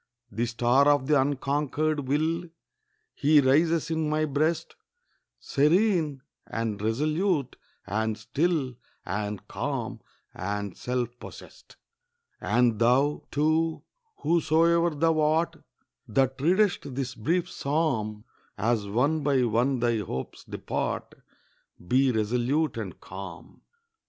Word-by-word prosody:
The 115 +4 -1
star 120 +4 +3
of 145 -2 +4
the 145 -1 +4
unconquered 145 +1 -1
will, 160 +5 0 0.7
He 150 +1 +4
rises 160 +5 +3
in 160 -1 0
my 155 0 +1
breast, 155 +3 -1 0.6
Serene, 155 -2 +2 0.2
and 110 -3 -3
resolute, 150 - 0 0.3
and 110 +2 -1
still, 140 +1 -1 0.3
And 105 +1 -4
calm, 125 -3 -3 0.3
and 100 0 -4
self 125 -1 -2
possessed. - - -13 0.6
And 120 -3 +2
thou, 130 +5 +2
too, 155 +2 +1 0.4
whosoe'er 170 +1 +3
thou 160 +1 +1
art, 155 +2 +1 0.5
That 130 +4 +1
readest 175 -5 +2
this 130 -1 -3
brief 170 +11 0
psalm, 135 - -1 0.3
As 110 0 0
one 140 +10 +1
by 140 -3 +2
one 120 +3 +1
thy 120 -2 +2
hopes 65 -10 -5
depart, - - -3 0.7
Be 130 +3 +3
resolute 125 +8 0
and - - -6
calm. - - -10
140 Hz, 105 wpm, -27 LUFS, 120-155 Hz, 0.7 s, of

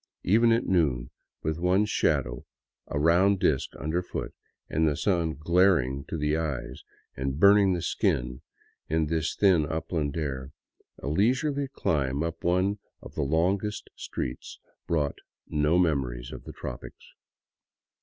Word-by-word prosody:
Even 115 +5 +4
at 115 +1 +2
noon, 70 -10 +1 0.3
with 80 +1 -1
one's 95 +4 +2
shadow - - 0 0.4
a 70 - -2
round 90 +5 +4
disk 70 -6 +1
under 80 +5 -1
foot 90 - -5 0.3
and 80 +1 +1
the 75 -2 0
sun 85 -5 0
glaring 80 -5 +2
to 80 - -4
the 75 0 0
eyes 80 -5 -4 0.3
and 65 +2 -3
burning 100 0 +6
the 85 -2 -2
skin 60 0 0 0.5
in 80 0 +2
this 80 +1 -1
thin, 95 -6 +4
upland 80 -1 -2
air, 70 -3 -4 0.4
a - - -7
leisurely 130 - +1
climb 70 - -1
up 85 0 -4
one 95 +4 +1 0.2
of - - -10
the - - -2
longest 90 +8 0
streets 65 0 -5 0.3
brought 75 -4 0 0.3
no 75 +3 +2
memories 65 -8 0
of - - -9
the - - -8
tropics. - - -9
80 Hz, 140 wpm, -27 LUFS, 70-95 Hz, 0.5 s, burning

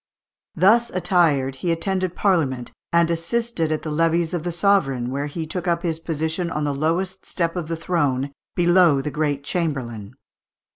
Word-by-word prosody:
Thus 230 +7 +4
attired 165 - +2
he 170 +5 -1
attended 185 +1 -1
Parliament, 145 -11 0 0.2
and 170 0 +3
assisted 170 0 -1
at 155 - -1
the 155 - -4
levees 165 +2 +1
of 175 - -1
the 175 +2 -3
sovereign, 160 -10 +1
where 140 +2 -2
he 160 +2 -5
took 180 +3 -5
up 170 0 +1
his 165 -2 -1
position 160 +2 -2
on 150 -2 -2
the 145 -1 0
lowest 175 +6 -1
step 170 -1 -2
of 175 -3 -3
the 165 - -2
throne, 145 -6 0 0.2
below 175 -4 +4
the 150 - -3
great 145 -2 -1
Chamberlain. 130 - -3
165 Hz, 165 wpm, -22 LUFS, 145-180 Hz, 0.2 s, Thus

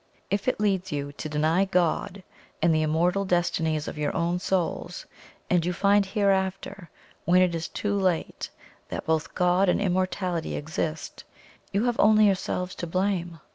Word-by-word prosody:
If 200 +3 -1
it 255 - +1
leads 195 -3 0
you 145 -1 -3
to 155 +2 -7
deny 155 +5 +2
God 185 +1 0 0.4
and 165 0 +3
the 155 - +2
immortal 170 +5 +1
destinies 165 -4 0
of 150 - -6
your 150 - 0
own 170 +1 0
souls, 180 -1 -2 0.4
and 175 -2 +2
you 180 +1 -1
find 200 +3 +3
hereafter, 190 -2 -1 0.4
when 180 +1 +5
it 180 -2 +1
is 165 0 -3
too 205 -1 -3
late, 185 -4 -1 0.4
that - - -5
both 160 -1 -1
God 180 +1 +3
and - - +2
immortality 185 -3 -1
exist, 155 +1 -4 0.5
you 200 +2 +1
have 240 -1 0
only 215 0 +6
yourselves 185 -2 0
to 175 - -4
blame. 175 -2 -1
180 Hz, 160 wpm, -26 LUFS, 165-195 Hz, 0.5 s, only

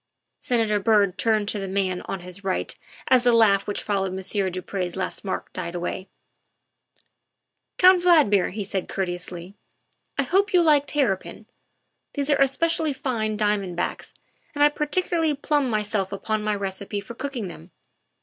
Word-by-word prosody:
Senator 225 -4 +1
Byrd 205 -3 +3
turned 215 -2 +1
to 210 - -2
the 195 - -4
man 190 -1 -1
on 195 - -4
his 180 +2 -9
right 190 -1 -1 0.4
as 255 -2 +5
the 245 - +5
laugh 210 -4 +4
which 205 - -3
followed 195 -2 -1
Monsieur 190 +1 -1
du 185 0 -5
Pre's 180 -1 -4
last 190 - -4
remark 190 - -4
died 175 -1 -5
away. 175 +2 -4 0.8
" - - -36
Count 365 0 +7
Valdmir," 300 - +4
he 205 +2 -4
said 195 -1 -3
courteously, 180 -1 -4 0.3
" - - -37
I 280 - +2
hope 385 +8 +1
you 350 - +6
like 295 -3 +4
terrapin; 225 -7 -1 0.7
these 285 0 0
are 285 - +4
especially 310 +3 +2
fine 230 -5 -2
diamond 205 -4 0
backs, 175 - -3 0.4
and 290 - +3
I 295 - +7
particularly 315 +1 0
plume 290 -1 0
myself 210 -3 -1
upon 215 +2 -2
my 210 0 0
recipe 200 +1 -4
for 200 +4 -9
cooking 255 -4 -4
them. 85 - -11
210 Hz, 165 wpm, -24 LUFS, 190-275 Hz, 0.8 s, Count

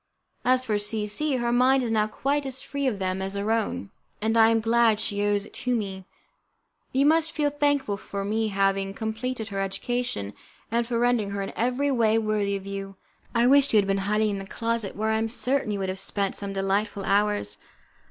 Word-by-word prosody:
As 255 0 +3
for 210 -3 0
C 210 +1 -2
C, 270 +8 0
her 240 -1 0
mind 255 +2 +4
is 235 - -2
now 215 -1 +2
quite 275 +5 -1
as 265 0 -4
free 280 -1 -2
of 230 -6 0
them 190 0 -2
as 195 +1 -2
our 205 +2 -1
own, 220 - -1 0.3
and 220 +2 0
I 225 0 +6
am 225 0 +3
glad 225 -1 +3
she 205 -2 -1
owes 205 -1 +1
it - - -15
to 250 0 -1
me. 195 -4 -4 0.9
You 270 +2 +2
must 320 +1 +4
feel 295 -2 0
thankful 285 -8 0
to 200 0 -5
me 220 +2 0
for 200 - -8
having 195 0 +1
completed 225 +1 -3
her 195 -1 -3
education, 195 - -2 0.4
and 235 0 +1
for 235 -1 -1
rendering 240 -3 +2
her 200 0 -3
in 195 - -6
every 255 +4 +1
way 225 -3 +3
worthy 215 -2 0
of 195 -1 -6
you. 195 0 -6 0.4
I 235 +1 +4
wish 280 +2 +5
you - - +6
had 205 - +4
been 195 0 0
hiding 210 0 +2
in 200 - -3
the 195 - -8
closet, 230 -2 -2
where 220 +1 -1
I 220 0 +2
am 225 - 0
certain 250 +1 0
you 205 - -1
would 190 -1 -2
have 190 0 -3
spent 200 -1 -1
some 200 -1 -4
delightful 195 +1 -1
hours. 205 - +1
220 Hz, 220 wpm, -26 LUFS, 200-245 Hz, 0.9 s, I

